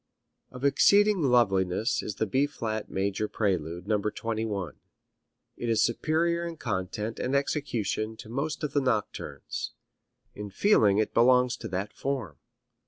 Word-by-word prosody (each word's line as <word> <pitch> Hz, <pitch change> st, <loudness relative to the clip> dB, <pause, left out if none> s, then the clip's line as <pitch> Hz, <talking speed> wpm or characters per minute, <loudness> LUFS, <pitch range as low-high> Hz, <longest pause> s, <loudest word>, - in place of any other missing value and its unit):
Of 125 Hz, +2 st, -6 dB
exceeding 205 Hz, +7 st, +5 dB
loveliness 110 Hz, -, +2 dB
is 105 Hz, -, -5 dB
the 110 Hz, -, 0 dB
B 135 Hz, +7 st, +1 dB
flat 110 Hz, -6 st, -4 dB
major 100 Hz, +2 st, -1 dB
prelude, 90 Hz, -5 st, -2 dB
No. 105 Hz, -1 st, +2 dB
21. 105 Hz, -4 st, -3 dB, 0.8 s
It 120 Hz, -, -3 dB
is 115 Hz, -, +3 dB
superior 165 Hz, +7 st, +1 dB
in 170 Hz, -1 st, -5 dB
content 105 Hz, 0 st, -3 dB
and 130 Hz, +2 st, -1 dB
execution 110 Hz, -6 st, -1 dB
to -, -, -10 dB
most 140 Hz, +7 st, -3 dB
of 145 Hz, -2 st, -2 dB
the 145 Hz, -, +2 dB
nocturnes. 115 Hz, -6 st, -3 dB, 0.6 s
In 105 Hz, 0 st, -7 dB
feeling 105 Hz, -, +4 dB
it 110 Hz, -, 0 dB
belongs 125 Hz, +1 st, +4 dB
to -, -, -6 dB
that 95 Hz, +2 st, -4 dB
form. 130 Hz, -, -3 dB
115 Hz, 140 wpm, -28 LUFS, 100-140 Hz, 0.8 s, exceeding